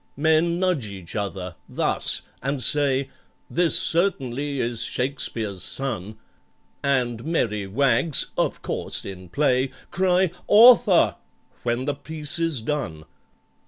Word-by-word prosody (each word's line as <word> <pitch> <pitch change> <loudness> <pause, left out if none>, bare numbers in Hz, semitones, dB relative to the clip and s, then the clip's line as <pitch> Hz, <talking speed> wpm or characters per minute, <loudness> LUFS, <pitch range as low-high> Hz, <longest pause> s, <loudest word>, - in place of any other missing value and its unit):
"Men 160 +3 +2
nudge 180 -11 0
each 95 -4 -9
other—thus—and 100 - -3
say, 140 -2 +1 0.4
'This 175 -1 +6
certainly 145 -6 0
is 120 -1 -1
SHAKESPEARE'S 115 -7 -3
son,' 110 -6 -4 0.6
And 125 -4 0
merry 110 -11 -1
wags 135 +7 +2
(of - - -2
course - - -3
in 95 -2 -9
play) 130 - +1 0.2
Cry 185 -1 +2 0.2
'Author!' 210 - +6 0.4
when 120 +2 -2
the 145 - -1
piece 150 +2 -6
is 165 -7 -1
done. 110 - -4
135 Hz, 105 wpm, -23 LUFS, 110-160 Hz, 0.6 s, This